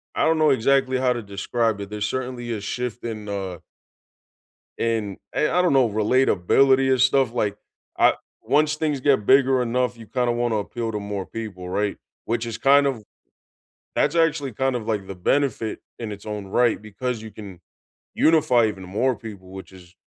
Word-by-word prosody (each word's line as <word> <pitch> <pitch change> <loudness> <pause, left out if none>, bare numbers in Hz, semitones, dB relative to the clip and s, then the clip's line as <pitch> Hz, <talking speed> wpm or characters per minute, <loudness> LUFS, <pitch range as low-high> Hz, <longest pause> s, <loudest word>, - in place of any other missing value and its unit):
I - - +2
don't 160 0 +3
know 155 -2 +4
exactly 130 +1 +2
how 125 -1 +2
to 120 - -4
describe 105 +2 -1
it, 100 - -7
there's 105 -1 -3
certainly 125 0 -4
a 105 - -4
shift 125 +3 -4
in, 110 -2 -5
uh 95 -3 -4 1.2
in 110 -4 -1 0.2
a 150 - +2
I 180 - +2
don't 180 -5 +2
know, 130 -4 +4
relatability 130 +4 +3
and 130 -2 +3
stuff, 130 -2 +3
like, 105 -4 -1 0.4
I - - +5 0.3
Once 150 +1 +2
things 150 -3 -1
get 135 -7 +2
bigger 130 0 +4
enough, 125 0 0
you 115 - -12
kinda 125 0 0
wanna 120 -1 0
appeal 115 +2 -3
to 105 - -3
more 100 -2 -4
people, 105 -5 -7
right? 100 +2 -1 0.3
Which 115 +1 -2
is 115 -2 -5
kind 140 +2 +5
of 120 -6 -3 0.9
That's - - +2
actually 155 -4 +1
kind 130 +3 0
of 115 -3 -4
like 105 -3 -2
the 95 - -7
benefit 115 +3 0 0.2
in 110 -3 -5
its 100 0 -9
own 105 -2 -5
right 120 +3 +2
because 110 +3 -4
you 110 0 -9
can 95 -5 -11 0.5
unify 135 -8 +4
even 95 -3 -5
more 115 +7 0
people, 100 -4 -10
which 95 0 -10
is 90 -1 -16
115 Hz, 180 wpm, -23 LUFS, 105-130 Hz, 1.2 s, I